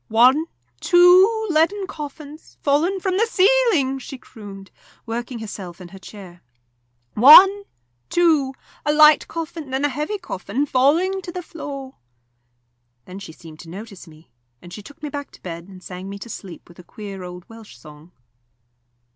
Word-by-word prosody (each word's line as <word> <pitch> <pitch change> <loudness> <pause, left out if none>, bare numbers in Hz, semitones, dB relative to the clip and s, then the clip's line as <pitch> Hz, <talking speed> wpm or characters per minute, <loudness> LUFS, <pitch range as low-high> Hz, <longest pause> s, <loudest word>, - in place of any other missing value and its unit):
"One 255 +8 +4 0.3
two 370 - +5
leaden 335 +6 +1
coffins, 300 -2 -10
fallen 320 +7 +1
from 375 0 -1
the 455 - +2
ceiling!" 390 - +2
she 270 +1 -9
crooned, 200 -6 -12 0.3
working 235 +2 -5
herself 195 -5 -8
in 180 -2 -11
her 195 +2 -13
chair. 185 -2 -13 0.7
"One 380 - +8 0.4
two 310 -6 +2 0.3
a 295 - +1
light 300 0 +6
coffin 325 -3 -7
and 275 +2 0
a - - +1
heavy 300 +10 -3
coffin, 245 - -4
falling 320 +9 +1
to 355 - -8
the 360 0 -6
floor!" 275 -5 -9 1.1
Then 185 +2 -10
she 190 -5 -10
seemed 160 -1 -14
to 165 - -12
notice 200 +1 -10
me, 155 -3 -18 0.3
and 175 +5 -13
she 210 - -8
took 285 +7 -16
me 300 - -4
back 285 0 -6
to - - -18
bed 170 -1 -8
and 185 -2 -14
sang 185 +1 -8
me 200 - -7
to 220 +4 -10
sleep 190 -5 -10
with 175 - -18
a - - -12
queer 200 +1 -9
old 180 0 -10
Welsh 225 -1 -14
song. 150 +2 -16
265 Hz, 165 wpm, -21 LUFS, 195-325 Hz, 1.1 s, One